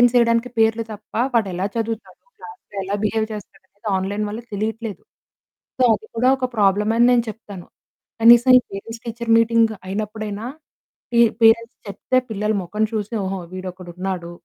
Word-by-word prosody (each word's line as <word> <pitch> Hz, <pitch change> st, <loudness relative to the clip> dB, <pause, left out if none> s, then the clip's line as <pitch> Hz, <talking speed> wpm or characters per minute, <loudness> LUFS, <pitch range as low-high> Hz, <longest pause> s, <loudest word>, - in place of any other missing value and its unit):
Attendance 245 Hz, -1 st, +5 dB
వేయడానికి 235 Hz, 0 st, +3 dB
పేర్లు 225 Hz, 0 st, +3 dB
తప్ప, 210 Hz, 0 st, -13 dB, 0.2 s
వాడెలా 195 Hz, -5 st, 0 dB
చదువుతాడు, 225 Hz, 0 st, -4 dB, 0.2 s
క్లాస్‌లో 440 Hz, -, -13 dB
ఎలా 195 Hz, +1 st, -3 dB
బిహేవ్ 220 Hz, +1 st, 0 dB
చేస్తాడనేది 200 Hz, 0 st, -10 dB
ఆన్లైన్ 200 Hz, +3 st, -2 dB
వల్ల 215 Hz, +2 st, -5 dB
తెలియట్లేదు. 220 Hz, +1 st, -4 dB, 0.8 s
సో 255 Hz, -, +3 dB
అది 220 Hz, +1 st, -7 dB
కూడా 250 Hz, +3 st, +3 dB
ఒక 260 Hz, -1 st, -1 dB
ప్రాబ్లమే 210 Hz, +2 st, +2 dB
అని 240 Hz, -, +6 dB
నేను 240 Hz, -1 st, +3 dB
చెప్తాను. 205 Hz, -5 st, -11 dB, 0.6 s
కనీసం 240 Hz, +2 st, +7 dB
ఈ -, -, -1 dB
parents 225 Hz, +4 st, -7 dB
teacher 235 Hz, 0 st, -5 dB
meeting 230 Hz, -1 st, +3 dB
అయినప్పుడైనా 210 Hz, +1 st, -4 dB, 0.7 s
P 235 Hz, -, +4 dB, 0.2 s
parents 230 Hz, +2 st, +4 dB
చెప్తే 200 Hz, +6 st, -1 dB
పిల్లలు 215 Hz, 0 st, -1 dB
మొఖం 210 Hz, +5 st, -2 dB
చూసి, 215 Hz, +1 st, -3 dB
"ఓహో! 190 Hz, 0 st, -3 dB
వీడొకడున్నాడు. 185 Hz, -1 st, -6 dB
215 Hz, 145 wpm, -21 LUFS, 200-230 Hz, 0.8 s, కనీసం